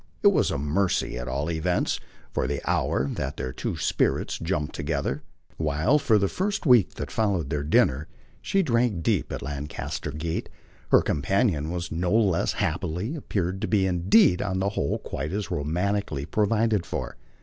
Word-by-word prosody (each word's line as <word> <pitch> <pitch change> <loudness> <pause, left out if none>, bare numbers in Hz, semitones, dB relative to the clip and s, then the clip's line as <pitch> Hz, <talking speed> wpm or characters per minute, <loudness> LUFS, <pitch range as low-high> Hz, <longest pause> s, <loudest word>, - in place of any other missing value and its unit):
It - - +8
was - - +2
a - - -1
mercy 75 +2 0
at 60 - -5
all 70 +6 -2
events, 85 +2 0 0.3
for - - 0
the 70 +1 -1
hour, 65 - +1
that - - -4
their 65 0 -4
two - - -3
spirits - - 0
jumped 75 -3 -2
together. 70 -1 -2 0.4
While, 80 - +2
for 110 -6 +3
this 100 -1 +1
first 195 0 -1
week 125 - +5
that 70 - -5
followed 100 -8 0
their 75 -2 0
dinner, 70 0 +2 0.3
she 195 0 +1
drank 115 - +1
deep - - +1
at - - -4
Lancaster 70 +1 -4
Gate, 80 +2 -3 0.4
her - - +6
companion 80 - +1
was 85 0 -4
no 90 +2 -1
less 100 -7 +2
happily, 95 - -2
appeared 95 - -2
to - - -1
be 100 -3 +2
indeed 90 +1 +4
on 95 - -1
the 95 +1 +1
whole 70 -8 -1
quite 75 +4 -5
as 100 -3 -3
romantically, 85 0 -1
provided 105 +1 +1
for. 65 -6 -5
85 Hz, 170 wpm, -26 LUFS, 75-100 Hz, 0.4 s, It